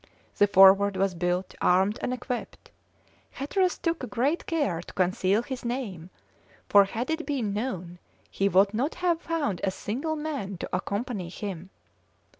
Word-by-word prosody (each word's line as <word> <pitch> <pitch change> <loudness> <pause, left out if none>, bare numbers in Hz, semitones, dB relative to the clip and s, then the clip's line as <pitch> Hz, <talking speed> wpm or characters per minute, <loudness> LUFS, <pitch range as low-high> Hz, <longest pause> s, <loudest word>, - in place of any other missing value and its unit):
The 205 - +5
Forward 195 0 +6
was 195 0 +1
built, 180 +1 -1
armed, 190 +5 +3
and - - -1
equipped. 250 0 -5 0.6
Hatteras 365 +7 0
took 330 -8 -2
great 270 +10 0
care 285 - 0
to - - -12
conceal 190 +3 +1
his 260 0 -6
name, 225 -9 -4 0.6
for 200 -1 +6
had 235 +8 -3
it 320 +1 -1
been 250 -9 -1
known 185 -6 -4 0.3
he 195 +1 +1
would 195 +2 +4
not 260 +8 -1
have 350 -2 0
found 300 - -2
a 195 - +2
single 255 +11 -3
man 280 - -4
to - - -6
accompany 200 0 -3
him. 185 -1 -6
205 Hz, 150 wpm, -27 LUFS, 190-270 Hz, 0.6 s, Forward